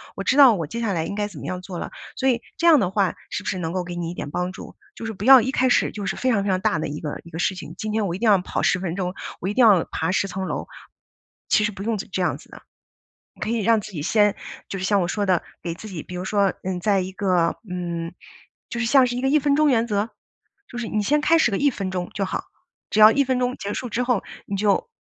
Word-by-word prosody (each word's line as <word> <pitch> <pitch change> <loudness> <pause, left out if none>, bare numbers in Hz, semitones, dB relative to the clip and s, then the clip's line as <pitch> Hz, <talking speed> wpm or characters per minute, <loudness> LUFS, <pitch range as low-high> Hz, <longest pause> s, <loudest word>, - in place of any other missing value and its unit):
我 195 - -4
知 260 - +1
道 270 -5 +9
我 165 -5 -3
接 230 - -5
下 220 -4 0
来 160 -2 -1
应 200 - -4
该 205 0 -1
怎 185 -8 -11
么 - - -8
样 180 0 -4
做 180 -1 -7
了。” - - -5 0.2
所 265 - +1
以， 240 -2 +1 0.2
这 340 - +2
样 320 -4 +7
的 185 - +1
话， 195 -2 +1
是 205 - -4
不 - - -3
是 190 - -2
能 165 -2 -3
够 185 -1 -1
给 175 0 -7
你 170 -1 -3
一 - - -6
点 145 - -6
帮 180 +3 -2
助？ - - -11 0.2
就 - - -7
是 225 - -4
不 205 +1 -6
要 265 -1 +9
一 255 +4 -1
开 260 0 +2
始 - - +3
就 205 -2 -6
是 195 - -2
非 260 - 0
常 200 -4 +1
非 200 - -1
常 185 -1 +1
大 165 - +1
的 - - -2
一 150 +1 -5
个 150 -2 -5
一 170 - -13
个 165 - -7
事 190 - +1
情。 165 -3 -8
今 215 +1 -4
天 215 -1 0
我 170 - -2
一 - - -7
定 235 - +1
要 205 - +6
跑 180 - -3
10 180 - +2
分 180 -2 -3
钟， 180 -1 -2 0.3
我 185 - -2
一 - - -2
定 250 +2 +5
要 200 -6 +6
爬 160 +2 -1
10 195 +1 +1
层 190 0 -4
楼， - - -4 0.8
其 215 - +4
实 215 - 0
不 195 - -9
用 225 0 -1
这 195 - -6
这 185 - -1
样 180 - 0
子 - - -18
的。 - - -12 0.7
你 - - -21
可 215 - -2
以 230 0 0
让 225 +1 +3
自 215 - -9
己 160 -6 -5
先 205 +3 +3 0.3
就 195 - -4
是 190 - -3
像 200 0 +3
我 175 - 0
说 205 +3 -1
的 185 -3 +2 0.2
给 170 -1 -3
自 195 +6 -10
己 175 -6 -6
比 - - -11
如 180 - -4
说， 200 -1 +2
嗯， 185 -1 -2
在 200 +1 +2
一 185 0 -3
个 185 -3 +1
嗯， 170 -2 -4 0.6
就 235 - -4
是 235 - 0
像 260 +2 +5
是 245 - -3
一 - - -2
个 265 - +1
1 305 +2 +4
分 285 0 +2
钟 300 -1 +4
原 230 -2 +2
则， 210 0 0 0.6
就 245 - -8
是 240 -2 -3
你 215 - -1
先 290 +8 +2
开 320 +2 +4
始 280 - +4
个 200 - -1
1 285 -1 +3
分 195 -5 -4
钟 180 -1 -3
就 195 - -1
好。 - - -3 0.5
只 215 - +1
要 215 +1 +10
1 280 +4 +3
分 260 -1 0
钟 250 0 0
结 200 +1 -4
束 250 - -4
之 235 +3 -1
后， 245 -5 +1 0.2
你 200 - -4
就 200 0 +1
200 Hz, 315 characters per minute, -23 LUFS, 180-230 Hz, 0.8 s, 要